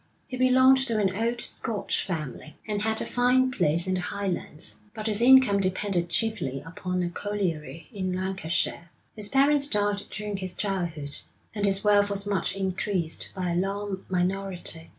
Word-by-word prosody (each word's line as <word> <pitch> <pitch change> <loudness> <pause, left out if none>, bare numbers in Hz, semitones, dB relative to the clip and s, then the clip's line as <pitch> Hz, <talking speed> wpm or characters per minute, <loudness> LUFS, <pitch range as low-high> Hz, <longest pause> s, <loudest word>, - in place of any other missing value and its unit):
He 255 - -5
belonged 260 +1 +5
to 230 -3 0
an 195 -3 +1
old 235 +3 -1
Scotch 220 -3 -2
family, 155 -4 -5
and 210 -1 -1
had 220 +1 0
a - - -5
fine 255 +1 +2
place 170 -6 +1
in 185 - -1
the 185 - 0
Highlands, 180 -4 +1 0.2
but 215 -1 -6
his 215 0 +1
income 255 -5 +6
depended 185 -2 -1
chiefly 170 - -1
upon 180 +2 -3
a 175 - -1
colliery 170 -6 -4
in 190 -3 -2
Lancashire. 180 -2 -1 0.3
His 210 -2 +2
parents 280 +2 +3
died 205 -4 0
during 210 -1 -4
his 185 -1 -4
childhood, 170 -8 -3 0.4
and 205 -1 -1
his 195 0 +2
wealth 205 -1 +4
was 200 0 -2
much 200 -3 -1
increased 190 -3 -2
by 180 -2 -2
a - - -1
long 195 +1 -2
minority. 180 -2 -2
195 Hz, 165 wpm, -26 LUFS, 180-215 Hz, 0.4 s, income